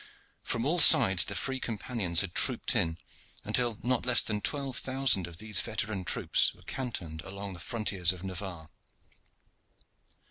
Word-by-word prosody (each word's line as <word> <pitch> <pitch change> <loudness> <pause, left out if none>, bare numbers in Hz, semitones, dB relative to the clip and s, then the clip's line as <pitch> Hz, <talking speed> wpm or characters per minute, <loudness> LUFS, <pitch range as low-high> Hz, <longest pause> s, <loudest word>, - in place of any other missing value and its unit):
From 115 +1 -4
all 170 +5 -1
sides 95 - +7
the 100 - -7
free 130 +5 -4
companions 105 -7 0
had 95 -3 -4
trooped - - +3
in, 80 0 -1 0.5
until 120 -3 -1
not 125 0 -2
less 125 -1 +4
than 105 -1 -4
twelve 135 -1 -3
thousand 130 -9 0
of 85 -2 -13
these 105 0 -1
veteran 110 -4 -5
troops - - 0
were - - -22
cantoned 90 -12 -7
along 100 +2 -9
the 90 - -12
frontiers 95 -4 -2
of 90 -1 -10
Navarre. 90 -4 -8
105 Hz, 150 wpm, -27 LUFS, 90-125 Hz, 0.5 s, sides